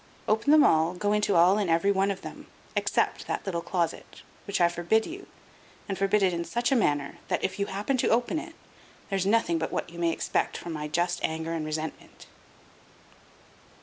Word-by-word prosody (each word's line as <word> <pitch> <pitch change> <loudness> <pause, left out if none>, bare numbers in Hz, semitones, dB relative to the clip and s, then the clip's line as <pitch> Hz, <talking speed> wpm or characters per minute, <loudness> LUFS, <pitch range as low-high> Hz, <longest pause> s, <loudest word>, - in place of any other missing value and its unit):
Open 220 +6 +1
them 305 -1 +7
all; 160 +3 +3
go 205 +3 0
into 210 -2 +1
all 180 +5 +5
and 200 -4 -1
every 165 +5 +3
one 195 0 +2
of 195 -1 -3
them, - - -9 0.3
except - - 0
that - - -3
little 175 -4 -2
closet, 170 -1 -3 0.2
which 200 - -1
I 175 - +5
forbid 175 +6 +1
you, 375 +4 -8 0.6
and 195 - -2
forbid 195 +2 +2
it 185 -2 +3
in 170 0 -2
such 240 +9 -1
a - - +4
manner 145 - 0
that, - - -1
if 190 +2 -2
you 200 - 0
happen 205 +7 -1
to - - +1
open 245 +7 +1
it, 330 +1 -10 0.6
there's 195 -1 0
nothing 200 -6 +2
but 160 - -3
what - - -3
you 170 - -10
may 170 -1 +2
expect - - -1
from 170 - -6
my 150 -1 -4
just 175 +3 0
anger 160 +1 -2
and 165 -2 -2
resentment." 155 +1 -6
190 Hz, 200 wpm, -27 LUFS, 170-210 Hz, 0.6 s, them